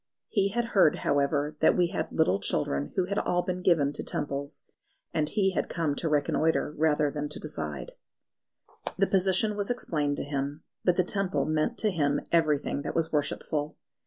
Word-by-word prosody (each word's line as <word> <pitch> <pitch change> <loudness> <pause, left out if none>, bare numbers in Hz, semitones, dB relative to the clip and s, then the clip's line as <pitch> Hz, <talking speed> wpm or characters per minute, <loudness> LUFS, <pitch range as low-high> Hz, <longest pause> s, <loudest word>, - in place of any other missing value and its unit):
He 200 -2 +2
had 235 +4 -1
heard, 190 -6 +5
however, 145 +1 +1
that 160 - +4
we 175 -1 +3
had 185 - -3
little 100 - +2
children 70 -6 -1
who 185 - +1
had 200 +2 -1
all 175 0 0
but 185 - -1
been - - -8
given 155 -6 +3
to - - -2
Temples, 140 0 -3 0.5
and 150 -1 0
he 195 -3 +1
had - - -2
come 165 -4 -1
to 165 - -1
reconnoitre 150 +1 +1
rather 150 -1 +2
than 145 0 -4
to - - -1
decide. - - -5 1.1
The 195 - +4
position 195 +3 +2
was 205 -1 -2
explained 150 -12 0
to - - -2
him. 145 +1 -4 0.2
But 180 - +3
the 185 - +3
Temple 180 -7 0
meant 155 - 0
to 215 - +2
him 145 -5 +1
everything 150 -4 +1
that - - -5
was 165 -1 +1
worshipful. 150 0 -1
155 Hz, 185 wpm, -28 LUFS, 145-185 Hz, 1.1 s, heard